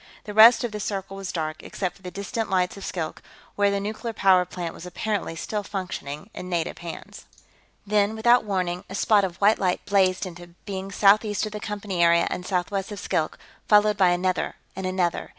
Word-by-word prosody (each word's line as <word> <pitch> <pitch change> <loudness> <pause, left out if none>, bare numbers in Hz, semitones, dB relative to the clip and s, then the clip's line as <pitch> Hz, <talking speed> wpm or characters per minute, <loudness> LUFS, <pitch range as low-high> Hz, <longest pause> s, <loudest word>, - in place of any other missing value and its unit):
The 210 - -7
rest 225 +4 +8
of 240 - -2
the 210 - -5
circle 195 -1 -4
was 195 -1 -5
dark, 155 -2 -3
except 185 -3 -4
for - - -21
the 180 - -7
distant 200 +3 -4
lights 180 -1 +1
of 200 - -9
Skilk, 165 -5 -4 0.3
where 205 0 +3
the 200 0 0
nuclear 220 +3 -4
power 190 -3 +4
plant 175 -2 -5
was - - -11
apparently 200 -1 -3
still 210 +5 -3
functioning 185 -3 -6
in 180 - -7
native 170 -2 -2
hands. 170 -1 -9 0.6
Then, 210 +1 +2
without 240 +2 +4
warning, 180 -4 -2
a 190 - -6
spot 205 0 +3
of 185 -3 -2
white 205 +2 +4
light 185 -2 0
blazed 190 -1 +2
into 175 -1 -10
being 195 -1 -5
southeast 205 +2 +3
of 215 - -5
the 210 - -5
Company 205 -4 -3
area 170 0 +5
and 180 - -4
southwest 195 +2 -2
of 205 - -6
Skilk, - - -1 0.3
followed 210 0 +5
by 190 -3 +4
another 180 +1 0 0.2
and 190 0 -3
another. 185 -2 -1
195 Hz, 200 wpm, -25 LUFS, 180-210 Hz, 0.6 s, rest